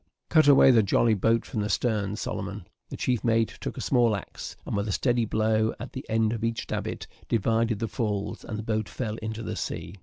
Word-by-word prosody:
Cut 155 -2 +5
away 135 -1 +8
the 115 -3 +6
jolly 110 +3 +3
boat 115 +3 +2
from 110 - -3
the 105 - -2
stern, 105 -2 0
Solomon." 100 -2 -5 0.2
The - - -6
chief 125 -3 0
mate 115 -2 +1
took - - -5
a - - -4
small 120 -4 +3
axe, 100 - -7
and, - - -3
with 100 +1 -1
a - - -1
steady 120 +2 +1
blow 110 0 +1
at 125 - -7
the 130 - -5
end 110 0 +2
of 115 -1 -4
each 115 0 -1
davit, - - -4 0.2
divided 115 +1 +1
the 115 +2 -2
falls, 105 -1 -3
and 110 - -5
the 110 - -5
boat 110 -1 -1
fell 110 -4 -4
into 110 +1 -5
the - - -4
sea. 90 +4 -5
110 Hz, 220 wpm, -27 LUFS, 105-115 Hz, 0.2 s, away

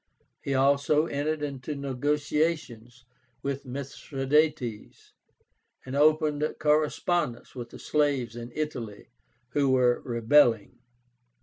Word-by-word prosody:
He 140 - -2
also 140 +3 +3
entered 150 0 -2
into 140 0 -4
negotiations 140 -3 -2 0.4
with 140 -1 -4
Mithradátes, 135 -2 -2 0.7
and 130 +1 -5
opened 150 0 +2
correspondence 150 -3 0
with 120 -2 -7
the - - -11
slaves 140 -6 0
in 120 0 -7
Italy, 120 -11 -5 0.4
who 140 +1 +1
were 125 -2 +3
rebelling. 120 -1 +3
140 Hz, 95 wpm, -27 LUFS, 125-150 Hz, 0.7 s, also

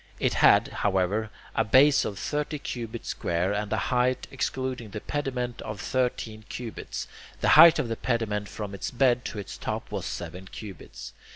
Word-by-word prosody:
It - - +1
had, - - +5
however, 100 +2 0 0.2
a - - +2
base 135 +5 +5
of 100 - -4
thirty 150 - -2
cubits 115 -4 -6
square, 85 +3 0
and 105 0 -2
a - - +1
height, 125 0 +1
excluding 130 -3 -3
the 105 - -5
pediment, 125 -3 -3
of 105 -1 -6
thirteen 115 -3 -2
cubits; 120 -3 -6 0.3
the - - +2
height 170 -1 +9
of 150 -5 0
the 115 - -2
pediment 110 -4 -1
from 105 -2 -6
its 100 - -4
bed 125 -1 +2
to - - -5
its 100 - -7
top - - -4
was - - -3
seven 90 +2 -6
cubits. 95 -3 -9
115 Hz, 170 wpm, -27 LUFS, 105-130 Hz, 0.3 s, height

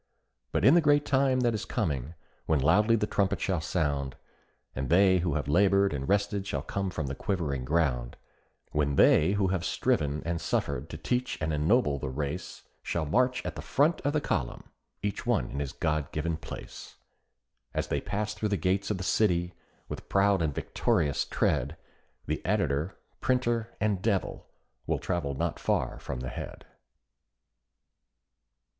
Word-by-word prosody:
But - - +1
in 135 - +8
the 175 - +6
great 145 -1 +4
time 130 -1 +2
that 120 -2 +2
is 110 - -2
coming, 70 +2 -2 0.3
when 80 -2 +3
loudly 105 - +4
the 105 - +1
trumpet 100 -2 0
shall 90 -5 0
sound, 70 -5 -1 0.6
And 65 0 -3
they 95 +2 +5
who 85 -4 0
have 75 -3 -2
labored 100 +4 +4
and 70 +1 -3
rested 100 0 +1
shall 70 -7 -2
come 95 +4 -2
from 80 -4 -3
the 70 - -3
quivering 70 -6 -2
ground; 65 -6 0 0.5
When 70 -2 +1
they 80 +6 +5
who 100 -2 +1
have 90 -2 -1
striven 75 0 0
and 85 0 -2
suffered 65 +6 -1
to 80 - -6
teach 125 +10 -1
and 80 0 -1
ennoble 75 - +2
the 70 - -3
race, 70 +6 -4 0.2
Shall 80 -2 -2
march 125 - +1
at - - -4
the - - -5
front 150 +5 +2
of 145 0 0
the 155 - +1
column, 60 - -3 0.3
each 105 -1 -3
one - - +1
in 70 - -3
his 70 -2 -3
God 75 -3 -1
given 80 +2 -1
place, 80 - -9 0.8
As - - -2
they - - 0
pass 105 +1 -2
through 105 0 -2
the 100 - +1
gates 95 +1 0
of 105 - 0
The 95 - -5
City 90 -3 +2 0.3
with - - -7
proud 100 -1 +3
and 80 -2 +1
victorious 70 +1 0
tread, 70 +5 0 0.5
The - - -3
editor, 75 +6 0 0.2
printer, 120 -3 0
and 100 -3 +1
"devil," 100 -2 -1 0.4
will - - +1
travel 85 -7 -2
not 85 +3 -2
far - - 0
from 60 - -5
the 65 - -4
head. - - -7
85 Hz, 170 wpm, -29 LUFS, 75-105 Hz, 0.8 s, in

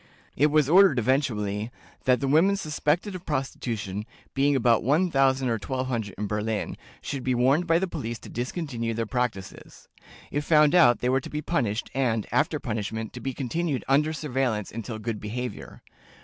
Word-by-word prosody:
It 145 - +4
was 150 -2 +3
ordered, 180 -3 +6
eventually, 110 -4 0 0.4
"that 125 0 +3
the 135 - 0
women 165 +8 +4
suspected 165 +2 -1
of 180 -1 -7
prostitution, 115 - -3 0.3
being 140 +1 +2
about 120 -3 +3
1000 135 -2 +2
or 115 -2 0
1200 125 -4 -3
in 105 - -2
Berlin, 105 +1 -2 0.3
should 135 -3 -4
be 130 -1 +1
warned 135 +8 +3
by 165 0 +4
the 190 - +1
police 120 -9 -4
to - - -11
discontinue 120 -3 -3
their 115 0 -1
practices. 120 -5 -4 0.4
If 145 +1 -1
found 150 -1 +4
out, 160 -10 +5
they 125 - +1
were 135 +1 +2
to - - -8
be 150 +1 -4
punished, 120 -9 -1
and, 115 -5 0
after 150 0 +1
punishment, 110 -1 -4
to 125 - -7
be 130 +2 -4
continued 145 +1 -2
under 150 +3 +3
surveillance 130 -9 -2
until 115 0 -5
good 110 0 -4
behavior. 125 +4 -6
130 Hz, 170 wpm, -26 LUFS, 115-150 Hz, 0.4 s, ordered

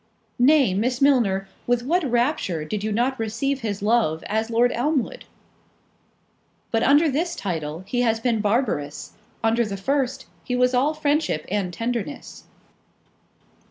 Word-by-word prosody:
"Nay, 265 -5 +5
Miss 240 +6 0
Milner, 230 -9 +3 0.2
with 240 0 +1
what 340 +7 +1
rapture 240 - 0
did 205 +6 -4
you 215 - -1
not 245 +4 0
receive 230 +5 -1
his 205 -3 -3
love, 210 -8 +1
as 220 +2 -1
Lord 235 +2 +3
Elmwood!" 295 - -1 1.5
"But 225 - +1
under 290 +6 +5
this 330 +5 -1
title 165 -3 -4
he 245 +4 -1
has 225 -2 +1
been 230 -2 0
barbarous; 205 - -1 0.3
under 225 +1 +3
the 200 -3 -4
first, 265 +4 -1 0.2
he 250 - -2
was 250 0 +2
all 280 +5 +2
friendship 295 - 0
and 195 -3 -1
tenderness." 235 +7 -5
240 Hz, 140 wpm, -23 LUFS, 205-270 Hz, 1.5 s, Nay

